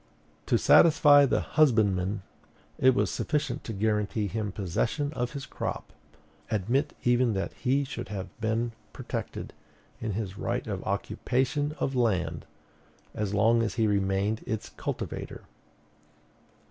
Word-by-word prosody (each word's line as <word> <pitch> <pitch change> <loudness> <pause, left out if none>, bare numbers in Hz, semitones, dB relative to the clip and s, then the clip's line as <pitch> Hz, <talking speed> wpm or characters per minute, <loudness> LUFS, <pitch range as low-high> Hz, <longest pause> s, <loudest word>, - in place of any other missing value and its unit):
To - - +3
satisfy 145 -3 +6
the - - +1
husbandman, 105 -9 +2 0.6
it 130 -1 +5
was - - +1
sufficient 150 -1 -2
to - - -4
guarantee 105 0 0
him 105 0 -3
possession 110 - -1
of 125 -2 -2
his 140 -2 -5
crop; - - -5 0.6
admit 120 - 0
even 120 -1 +3
that 95 -1 -2
he 135 +2 +1
should 135 -7 -6
have 100 -2 -4
been 115 +2 0 0.2
protected - - -5 0.5
in 110 -2 -3
his 100 -2 -4
right - - -2
of - - -4
occupation 145 +4 -1
of 135 - -1
land, 90 -10 0 0.7
as 105 -1 -2
long 115 +3 +4
as 115 - -1
he 115 -2 +2
remained 100 +1 +1
its 110 -1 -3
cultivator. - - -5
110 Hz, 130 wpm, -28 LUFS, 100-130 Hz, 0.7 s, satisfy